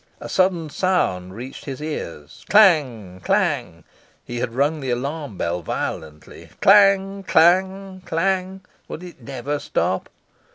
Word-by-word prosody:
A - - -8
sudden 180 -5 +1
sound 95 - 0
reached 125 +4 -9
his 135 -2 -6
ears 85 - -7
clang! 130 - +3
clang! - - 0 0.4
He 120 - -6
had 115 -1 -3
rung 145 +4 +1
the 135 -2 -4
alarm 140 - -3
bell 85 +1 -2
violently. 75 -1 -6
Clang! 195 0 +5
clang! 190 +2 +2
clang! 190 +2 -1 0.3
Would 170 - -8
it 175 -7 -12
never 140 +3 -4
stop? - - -2
155 Hz, 125 wpm, -22 LUFS, 120-190 Hz, 0.4 s, Clang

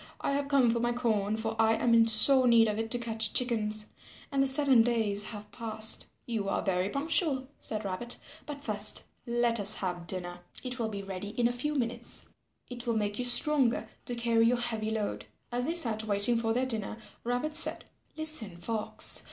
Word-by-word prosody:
I - - -3
have 280 0 -2
come 270 -4 +2
for 235 - -2
my 240 +1 -1
corn, 220 -4 -2
for 225 0 -4
I 225 0 +3
am 235 +1 0
in 230 0 +4
sore 255 +4 +7
need 230 -1 +4
of 210 0 -3
it 225 0 -4
to 245 - 0
catch 225 -2 0
chickens, 215 -4 -1 0.5
and 275 -1 0
the 275 - +2
seven 270 -3 +4
days 220 -3 +2
have 210 -2 -9
passed." 220 -2 +2 0.2
"You 220 -4 -4
are - - -2
very 185 0 -1
punctual," 280 - -2
said 215 -1 -5
Rabbit, 215 +6 -4 0.3
"but 290 -1 -8
first 210 -1 +3 0.2
let 235 -1 -1
us 205 +1 +5
have 175 -2 -5
dinner. 175 0 -6 0.2
It 255 0 -6
will 225 -1 -2
be 200 -2 -7
ready 195 +1 -7
in 235 - +3
a 240 - -3
few 295 +5 -4
minutes. 240 -2 0 0.4
It 245 -1 -9
will 230 -1 -1
make 205 0 -3
you 250 - 0
stronger 255 0 +4 0.2
to 245 - -5
carry 230 -1 +1
your 245 +1 +1
heavy 225 -2 -2
load." 220 -2 -5 0.2
As 245 +1 -3
they 330 - -2
sat 225 -10 +2
waiting 205 +3 +2
for 225 -1 -2
their 250 +3 -1
dinner, 220 -4 -4 0.3
Rabbit 245 +6 -3
said, - - +4 0.3
"Listen, 305 - -2
Fox. 215 +5 +2
230 Hz, 200 wpm, -28 LUFS, 215-245 Hz, 0.5 s, sore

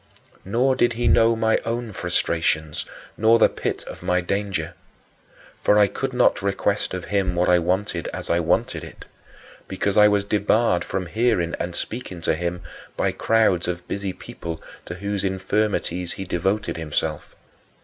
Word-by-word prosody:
Nor 125 +7 +2
did 120 -2 +2
he 120 +1 -1
know 115 +1 +5
my 110 0 +2
own 115 -1 -3
frustrations, 80 -3 -1 0.3
nor 110 +2 +5
the 115 - +6
pit - - -4
of - - -10
my 90 0 +1
danger. 90 -3 -2 0.9
For 105 - +4
I 105 - +7
could 135 +6 -3
not 125 -4 +3
request 100 0 0
of 90 - -5
him 95 -3 +1
what 90 +1 +2
I 90 0 +5
wanted 90 0 -1
as - - -6
I 85 - +2
wanted 85 0 0
it, - - -11 0.6
because 100 +2 -1
I 105 0 +8
was 105 -1 +2
debarred 105 -1 +2
from 95 -1 -3
hearing 90 -3 +1
and 85 0 -3
speaking 110 -7 -5
to - - +1
him 85 +2 -3 0.4
by - - +1
crowds 110 -7 +2
of 90 0 -4
busy 100 -1 -3
people 85 -2 -7 0.3
to 85 - -6
whose 100 +1 -3
infirmities 95 -2 -1
he 95 - -6
devoted 95 0 -1
himself. 75 -1 -3
95 Hz, 160 wpm, -23 LUFS, 85-105 Hz, 0.9 s, I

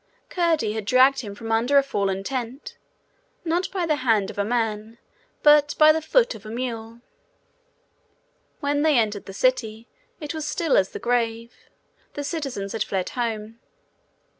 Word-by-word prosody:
Curdie 325 - +1
had 220 -2 -4
dragged 260 +4 +5
him 205 -5 -7
from 225 +1 -6
under 240 +5 +3
a 280 - +6
fallen 195 -7 -2
tent, 255 +2 -5 0.7
not 345 +3 0
by 370 -3 -2
the 305 -2 +1
hand 225 -7 +1
of - - -9
a - - +2
man, 225 0 -2 0.5
but 295 -1 +5
by 310 0 +8
the 320 +1 0
foot 470 +10 +2
of 215 - -12
a 215 - -9
mule. 230 -1 -5 1.6
When 285 0 0
they 305 -3 +3
entered 210 -3 -1
the - - -7
city, 225 0 0 0.3
it 300 0 -5
was 310 -2 -4
still 315 0 0
as 190 -1 +3
the - - -7
grave. 235 -1 -1 0.6
The 290 - -4
citizens 275 - -4
had 225 - -1
fled 190 -2 -3
home. 225 -2 -4
240 Hz, 165 wpm, -24 LUFS, 220-290 Hz, 1.6 s, by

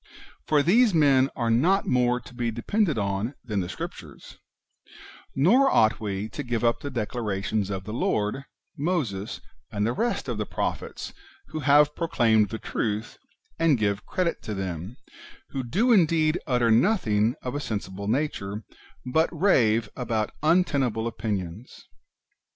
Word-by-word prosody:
For 150 -2 +3
these 215 - +4
men 135 -4 +4
are 115 -3 0
not 175 +12 +3
more 125 -1 +2
to 115 - -14
be 120 -1 -2
depended 155 - 0
on 100 +5 -2
than 105 -4 -1
the 90 -1 -3
Scriptures; - - -9 1.0
nor 235 - +5
ought 110 - +3
we 100 -1 -3
to 145 - -5
give 120 -3 -2
up 115 0 +2
the 145 - -5
declarations 110 -4 -2
of 95 -2 -4
the 105 +2 -7
Lord, 110 +3 -1 0.3
Moses, 135 - -2 0.3
and 105 -2 -1
the 115 - 0
rest 235 - -1
of 120 -4 -3
the 105 - -1
prophets, - - -4 0.4
who 155 - -4
have 145 +1 +4
pro 165 - -2
claimed 110 - +3
the 110 - -4
truth, 110 +2 -3 0.4
and 165 -5 +4
give 100 -1 -1
credit 180 -3 -1
to 105 - -5
them, 95 +4 -5 0.5
who 135 - -4
do 200 - +1
indeed 165 -4 +3
utter 120 -4 +2
nothing 115 - +2
of 125 - -4
a 145 - -2
sensible 100 -6 -5
nature, 110 -5 -2 0.4
but 160 +6 +2
rave 115 - +3
about 115 -4 -2
untenable 140 -9 +2
opinions. 105 -2 -5
120 Hz, 150 wpm, -26 LUFS, 105-150 Hz, 1.0 s, nor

